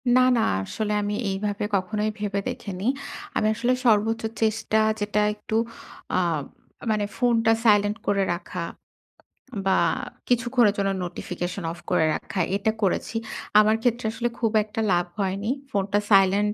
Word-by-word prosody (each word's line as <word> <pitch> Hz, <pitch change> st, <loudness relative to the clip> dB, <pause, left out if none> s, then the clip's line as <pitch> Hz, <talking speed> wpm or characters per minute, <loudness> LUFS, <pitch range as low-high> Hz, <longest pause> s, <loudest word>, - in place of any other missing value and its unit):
না, 255 Hz, -, +6 dB, 0.2 s
না, -, -, +3 dB, 0.2 s
আসলে 210 Hz, -, -3 dB
আমি 205 Hz, 0 st, -2 dB, 0.2 s
এইভাবে 205 Hz, +1 st, -2 dB
কখনোই 210 Hz, +3 st, 0 dB
ভেবে 205 Hz, -1 st, -1 dB
দেখিনি। 195 Hz, -1 st, -5 dB, 0.5 s
আমি 215 Hz, -, +2 dB
আসলে 240 Hz, +3 st, +1 dB
সর্বোচ্চ 225 Hz, 0 st, +3 dB, 0.2 s
চেষ্টা 220 Hz, 0 st, +1 dB, 0.2 s
যেটা 210 Hz, 0 st, 0 dB
একটু 215 Hz, +1 st, -5 dB, 0.6 s
আ -, -, +4 dB, 0.7 s
মানে 210 Hz, -1 st, +1 dB
ফোনটা 230 Hz, -3 st, +3 dB
silent 205 Hz, -1 st, +4 dB
করে 200 Hz, -1 st, +2 dB
রাখা, 175 Hz, 0 st, -5 dB, 1.0 s
বা 190 Hz, -1 st, +3 dB, 0.5 s
কিছুক্ষণের 240 Hz, -3 st, +3 dB
জন্য 195 Hz, -1 st, +1 dB
notification 175 Hz, +1 st, -5 dB
off 170 Hz, -, -9 dB
করে 160 Hz, -, +3 dB
রাখা 195 Hz, -, -5 dB, 0.2 s
এটা 205 Hz, +2 st, +1 dB
করেছি। 200 Hz, +3 st, 0 dB, 0.4 s
আমার 215 Hz, +1 st, +5 dB
ক্ষেত্রে 240 Hz, -1 st, 0 dB
আসলে 240 Hz, +2 st, -1 dB
খুব 225 Hz, -3 st, +1 dB
একটা 215 Hz, +1 st, -4 dB
লাভ 175 Hz, 0 st, +2 dB
হয়নি। 195 Hz, +2 st, -1 dB, 0.2 s
ফোনটা 200 Hz, -2 st, +1 dB
silent 200 Hz, +1 st, +5 dB
210 Hz, 140 wpm, -25 LUFS, 195-220 Hz, 1.0 s, না